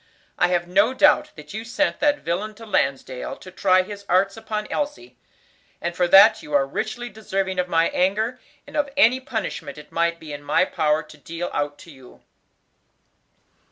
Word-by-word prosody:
I 175 - +5
have 175 -1 0
no 200 +8 +3
doubt 295 +3 +4
that 150 +1 -11
you 220 +1 -4
sent 295 +6 -1
that 290 -1 +2
villain 205 +6 -3
to 225 - -11
Lansdale 135 - -1
to 185 - -13
try 185 0 +3
his 200 +1 -9
arts 195 +2 +3
upon 215 -1 -4
Elsie; 295 +5 -4 0.6
and 170 0 -3
for 180 -1 +2
that 195 +2 +7
you 150 - -4
are 140 -1 +4
richly 220 - -4
deserving 195 -3 -3
of 180 - 0
my 165 -1 +3
anger, 215 +7 0 0.3
and 285 - -12
of 290 -1 +1
any 255 -1 +5
punishment 210 - -5
it 150 0 -13
might 170 0 0
be 155 -2 -9
in 145 - -7
my 145 - +2
power 155 0 0
to 150 0 -15
deal 165 +5 -5
out 145 0 -2
to 170 - -14
you. 130 -3 -17
185 Hz, 185 wpm, -23 LUFS, 160-220 Hz, 0.6 s, that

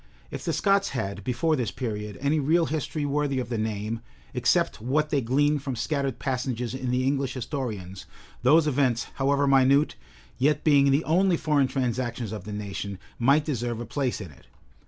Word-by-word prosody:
If - - -6
the - - -1
Scots 200 0 +2
had, 100 -1 -3
before 130 +8 +1
this 125 -5 -1
period, 105 -4 -4
any 145 +3 +2
real 160 +4 +3
history 155 -1 -2
worthy 145 -1 0
of 125 - -4
the 120 - -2
name, 110 +1 -3 0.3
except - - +1
what 150 +6 0
they 140 - +2
glean 145 +5 +2
from 135 -2 -4
scattered 140 0 -1
passages 125 -3 -2
in 130 -1 -3
the 125 +1 +1
English 135 -1 0
historians, 105 - -5 0.3
those 155 +6 +5
events, 130 -5 +1
however 140 +1 +2
minute, 135 +2 +4 0.5
yet 150 +3 +2
being 140 -3 +5
the 140 +4 +3
only 180 +2 +3
foreign 145 -4 +2
transactions 125 -4 -2
of 105 -4 -6
the 105 - -6
nation, 100 -1 -5 0.2
might 140 +5 +4
deserve 120 -5 -2
a 120 - -4
place 125 +2 -2
in 95 -7 -8
it. 70 - -20
130 Hz, 180 wpm, -26 LUFS, 115-145 Hz, 0.5 s, those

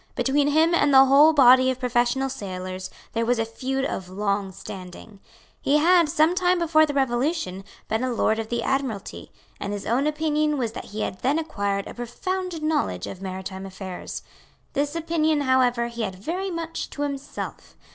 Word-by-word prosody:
Between 285 +1 +2
him 315 +3 +3
and 290 -4 +3
the 270 0 +8
whole 285 +4 +7
body 260 -3 +6
of 260 -1 -2
professional 245 +1 +1
sailors 185 -4 -6 0.2
there 230 - 0
was 245 +1 +1
a 225 - 0
feud 265 +4 -3
of 185 -7 -4
long 200 0 -1
standing. 190 +2 -10 0.4
He 290 - +3
had, 340 +1 +4
some 315 +2 +3
time 365 0 +2
before 315 -2 +4
the 290 - -3
Revolution, 255 - 0 0.2
been 220 +3 -1
a 255 - 0
Lord 220 -1 +1
of 220 0 -4
the 235 -1 -1
Admiralty; 265 -7 -3 0.3
and 200 - -4
his 205 - -5
own 255 +6 +1
opinion 300 -1 0
was 235 -4 -1
that 225 - -7
he 215 +1 -6
had 185 - -3
then 275 +4 +1
acquired 200 -11 -2
a - - -8
profound 355 +8 -4
knowledge 95 - 0
of 190 - -8
maritime 190 0 -6
affairs. 190 -1 -7 0.5
This 290 +2 -1
opinion 315 -2 +1
however 255 -3 +2
he 235 0 -5
had 190 -4 -3
very 350 - -3
much 335 -2 -4
to 290 - -4
himself. 280 -1 -6
260 Hz, 180 wpm, -24 LUFS, 205-305 Hz, 0.5 s, the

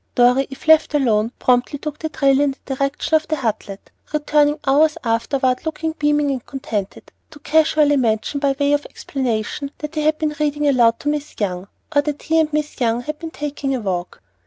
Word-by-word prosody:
Dorry, 250 +2 +4
if 270 +3 -11
left 315 -1 +5
alone, 225 -5 +2
promptly 250 +3 +1
took 300 +1 -6
the 315 - -3
trail 275 -2 +2
in 285 -2 +2
the 270 - -3
direction 275 +3 -2
of 315 0 +3
the 310 - 0
"Hutlet," 215 -6 -4 0.2
returning 295 0 +2
hours 300 +3 +3
afterward 250 +3 0
looking 320 0 -2
beaming 295 -2 +1
and 260 -3 -3
contented, 215 -8 -5 0.2
to - - -14
casually 305 -1 +3
mention 230 +3 0
by 280 -1 +1
way 285 0 +2
of 290 0 0
explanation 260 +1 -3
that 300 +1 -6
he 305 - -1
had 310 +1 +2
been 310 -1 -1
reading 295 0 0
aloud 235 -4 +4
to - - -6
Miss 295 0 -3
Young, 185 -2 -2 0.3
or 285 - +6
that 290 0 -4
he 325 +1 +2
and 310 -1 +1
Miss 300 -2 -3
Young 235 0 +1
had 305 +4 -6
been 330 - -6
taking 290 -3 -3
a - - -2
walk. 180 - -4
285 Hz, 200 wpm, -20 LUFS, 245-300 Hz, 0.3 s, or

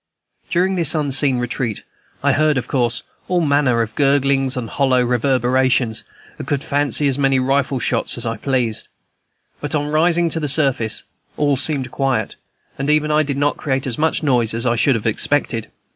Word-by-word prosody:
During 185 +1 +1
this 170 -2 +1
unseen 140 -3 +2
retreat, 120 -2 -3 0.4
I - - +3
heard, 155 -1 +2
of 130 - -3
course, 120 -3 -1 0.2
all 180 -1 +1
manner 140 -6 +2
of 115 0 -7
gurglings 135 -1 +1
and 120 -3 -3
hollow 130 0 +1
reverberations, 125 -1 +1 0.4
and - - -7
could 145 0 -1
fancy 145 0 +1
as 135 0 0
many 135 -1 +2
rifle 135 +1 +1
shots - - -1
as - - 0
I 115 0 -2
pleased. 120 -3 -1 0.7
But 145 +1 -4
on 150 0 -1
rising 170 +2 +2
to 165 - -1
the 150 -2 -2
surface 130 -6 +1 0.3
all 145 -1 +2
seemed 135 -2 -1
quiet, 135 -2 -1 0.5
and 140 +2 -2
even 150 0 +2
I 150 0 +3
did 140 -2 -2
not 145 +1 0
create 135 -3 -2
as 125 -1 -4
much 160 +1 0
noise 120 -6 +1
as 115 +2 -2
I 120 -1 +2
should 130 +3 +2
have 110 - -4
expected. 115 0 -1
135 Hz, 180 wpm, -19 LUFS, 125-145 Hz, 0.7 s, I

